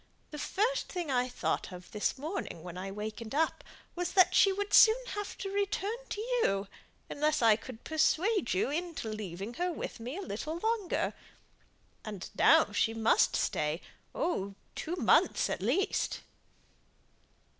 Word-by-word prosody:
The 300 - -6
first 460 +11 0
thing 350 -6 -3
I 250 0 +1
thought - - -2
of 180 0 -11
this 210 +4 -1
morning 300 - -5
when 175 -1 -8
I 185 +2 -5
wakened 215 +4 -6
up, 320 +2 +1 0.3
was 355 0 -2
that 370 -2 +6
she 390 - +6
would 405 +1 -3
soon 440 +1 +8
have 415 -1 -5
to 390 - -5
return 405 +2 -1
to - - -4
you, 430 - 0 0.4
unless 305 -1 0
I 225 -2 +7
could 230 +1 -10
persuade 330 - +1
you 195 - +1
into 330 -7 -3
leaving 205 0 -5
her 360 0 +1
with 315 - -6
me 250 +8 -5
a - - -4
little 310 - -4
longer. 440 -1 -1 0.9
And 205 -4 -6
now - - +5
she 225 0 +1
must 225 0 +3
stay 150 +2 0 0.4
oh, 200 - -1 0.2
two 335 +2 -4
months - - +3
at - - -3
least." 300 - 0
300 Hz, 155 wpm, -31 LUFS, -, 0.9 s, soon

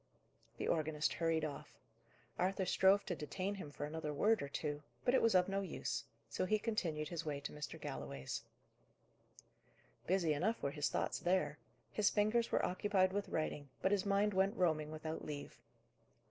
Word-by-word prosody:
The - - -2
organist 155 -1 +1
hurried 165 -1 +1
off. 150 0 -7 0.6
Arthur 190 +1 +1
strove 190 +2 +4
to 175 - -2
detain 185 +6 -3
him 190 -7 -6
for 145 0 -5
another 155 0 -3
word 210 +8 +3
or 140 - -2
two, 145 +1 -3 0.2
but 245 - +4
it - - +5
was 225 -4 +4
of 180 -1 +5
no 195 0 0
use. 115 -10 -3 0.2
So - - -1
he 215 +3 +3
continued 175 -9 -1
his 170 -2 -3
way 150 -3 -2
to - - -5
Mr. 150 0 -6
Galloway's. 70 0 -4 1.7
Busy 175 -4 +3
enough 200 +10 +1
were 140 - +1
his 145 0 0
thoughts - - -1
there. 180 -4 +1 0.3
His 210 -2 +3
fingers 215 +3 +2
were - - +3
occupied 185 0 +2
with 205 0 -1
writing, 150 -2 -2
but 190 - +3
his 200 -2 +3
mind 200 +1 +2
went 195 +4 +2
roaming 155 -4 +2
without 155 +1 -5
leave. 145 -2 -6
175 Hz, 175 wpm, -37 LUFS, 150-195 Hz, 1.7 s, it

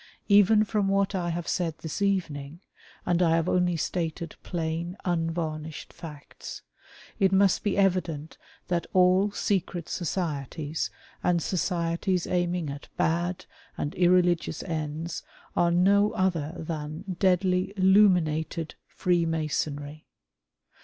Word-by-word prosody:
Even 205 +1 +6
from 210 -2 0
what 195 0 +2
I 175 -2 -1
have 170 0 -3
said 165 -3 -1
this 160 +4 -6
evening 170 -6 -1 0.2
— - - -25
and 175 0 +2
I 165 -2 +4
have 165 +1 +1
only 180 -2 +2
stated 165 0 -3
plain, 170 +1 -3
unvarnished 165 -3 -2
facts 150 -3 -9 0.3
— - - -21
it 190 -2 +4
must 195 -1 +4
be 205 -2 0
evident 175 -6 0 0.3
that 175 -1 -1
all 185 +2 +5
secret 190 -4 -1
societies 155 -3 -3 0.3
and 175 -1 +2
societies 175 +1 0
aiming 175 -3 0
at 140 +1 -8
bad 175 +2 0 0.3
and 145 - -2
irreligious 175 -3 +2
ends 160 0 -4 0.3
are 170 - +3
no 200 +4 +4
other 170 -4 0
than 155 0 -5 0.2
deadly 185 0 +2
Illuminated 180 -5 +3
Freemasonry. 155 -3 -1
175 Hz, 120 wpm, -27 LUFS, 160-185 Hz, 0.3 s, Even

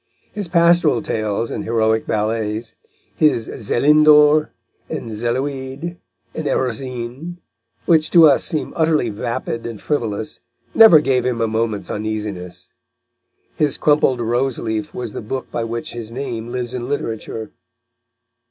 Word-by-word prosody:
His 205 -3 -4
pastoral 170 -1 +3
tales 110 -5 -2
and - - -4
heroic 110 -1 +1
ballets, 110 +1 -2 0.4
his 145 -7 +2
Zélindors 150 +5 +4 0.4
and 115 - -5
Zéloïdes 130 +7 -3 0.4
and 155 - -4
Erosines, 130 +6 -3 0.5
which 160 -2 +3
to 170 -2 +7
us 140 - +3
seem 155 - -2
utterly 155 -7 +2
vapid 115 +1 -4
and 115 -3 -7
frivolous, 110 -7 -3 0.3
never 215 -9 +8
gave 130 -3 +1
him 125 -2 -1
a 115 - +1
moment's 110 -1 -2
uneasiness. 105 -4 -5 0.9
His 150 -2 +1
crumpled 145 -4 +2
rose 120 +3 0
leaf 110 -2 -4
was 120 -4 -5
the - - -5
book 130 +5 -5
by 115 - -2
which 115 +1 -5
his 115 -2 -7
name 120 -2 -5
lives 125 -1 -4
in 125 0 -4
literature. 110 -5 -4
120 Hz, 130 wpm, -19 LUFS, 110-150 Hz, 0.9 s, never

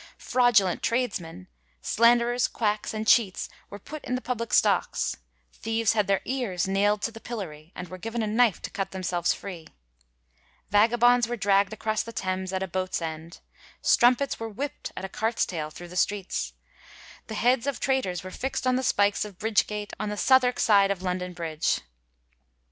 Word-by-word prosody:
Fraudulent 240 -7 +3
tradesmen, 185 -7 -2 0.3
slanderers, 240 +1 +3
quacks 210 -2 -1
and 215 0 -4
cheats 215 -4 +3 0.2
were 205 - -8
put 300 +9 -9
in 250 -2 -2
the - - -1
public 230 -3 -3
stocks; - - +2 0.4
thieves 225 -1 0
had 210 -3 +1
their 195 -1 +2
ears 240 -9 -1
naild 205 +2 +2
to 230 - -1
the 225 - -11
pillory, 175 -10 -7
and 180 - -6
were 185 +1 -9
given 225 +3 -3
a - - 0
knife 220 -1 +3
to - - -5
cut 195 -2 -3
themselves 180 -2 -1
free; 175 -5 -6 1.0
vagabonds 240 +3 +4
were 240 0 -3
dragd 200 -1 +3
across 215 0 -1
the 230 - -7
Thames 185 -3 -3
at 190 0 -1
a - - -3
boat's 185 +1 -2
end; 160 0 -7 0.4
strum 245 +1 +5
pets 280 +2 -3
were 225 0 -4
whipt 275 +7 -5
at - - -4
a - - -3
cart's 225 +4 0
tail 155 -4 -4
thru 175 +3 -10
the 180 - -11
streets; 180 - -1 0.7
the 220 - -6
heads 245 +3 +2
of 280 -3 -2
traitors 260 -11 0
were 185 - -7
fixt 265 +6 -3
on 255 0 +3
the - - 0
spikes 205 -5 +2
of 205 -4 -9
Bridge 220 +1 +2
Gate 210 -1 -5
on 210 0 -2
the 210 - -4
Southwark 255 +1 +4
side 200 -2 +5
of 190 -2 -2
London 180 0 -2
Bridge. 165 -3 -1
210 Hz, 180 wpm, -26 LUFS, 185-235 Hz, 1.0 s, strum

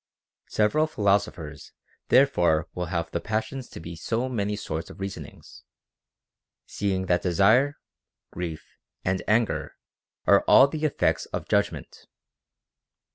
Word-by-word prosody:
Several 150 +9 +2
philosophers 100 - -1 0.3
therefore 85 - +3
will 90 -1 -3
have 85 -1 -3
the 85 - -1
passions 110 +4 -3
to - - -9
be 85 +1 -8
so 115 +9 -2
many 105 -5 -2
sorts 80 -5 -5
of - - -12
reasonings, 95 0 -8 1.0
seeing 95 -2 -2
that 90 -1 +1
desire, 110 - +3 0.5
grief, 85 -3 -5 0.4
and 95 0 0
anger 110 0 +1 0.5
are - - +5
all 135 - +8
the 155 +2 -3
effects 150 - 0
of - - -5
judgment. - - -2
100 Hz, 120 wpm, -26 LUFS, 85-115 Hz, 1.0 s, all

